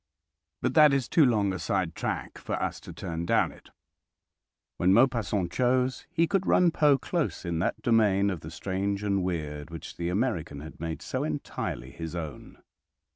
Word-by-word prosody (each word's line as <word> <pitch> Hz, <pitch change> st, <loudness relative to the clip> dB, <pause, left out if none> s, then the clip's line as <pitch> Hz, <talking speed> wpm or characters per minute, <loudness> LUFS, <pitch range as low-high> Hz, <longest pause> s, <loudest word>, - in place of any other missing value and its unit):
But -, -, +1 dB
that 150 Hz, -3 st, +7 dB
is 135 Hz, -3 st, +1 dB
too 160 Hz, -, +4 dB
long 105 Hz, -7 st, +3 dB
a 90 Hz, -, -4 dB
side 95 Hz, -4 st, -1 dB
track -, -, -4 dB
for -, -, -5 dB
us -, -, -2 dB
to -, -, -10 dB
turn 85 Hz, 0 st, -5 dB
down -, -, +3 dB
it. -, -, -17 dB, 1.1 s
When 90 Hz, +2 st, +4 dB
Maupassant 115 Hz, -7 st, +2 dB
chose 125 Hz, +3 st, +1 dB
he 170 Hz, -1 st, +2 dB
could 190 Hz, +2 st, 0 dB
run 180 Hz, -2 st, +5 dB
Poe 150 Hz, -3 st, +4 dB
close 165 Hz, -, -2 dB
in 85 Hz, -1 st, -1 dB
that 85 Hz, -, -1 dB
domain 100 Hz, -4 st, +3 dB
of 90 Hz, -, -4 dB
the 75 Hz, -, -9 dB
strange 100 Hz, +4 st, -2 dB
and 100 Hz, -2 st, +1 dB
weird 75 Hz, -4 st, -3 dB
which 80 Hz, -1 st, -8 dB
the 85 Hz, 0 st, -2 dB
American 90 Hz, -, -1 dB
had 80 Hz, -, -10 dB
made 80 Hz, 0 st, -4 dB
so -, -, -2 dB
entirely -, -, -4 dB
his 80 Hz, 0 st, -6 dB
own. 80 Hz, -6 st, -7 dB
100 Hz, 180 wpm, -28 LUFS, 85-125 Hz, 1.1 s, that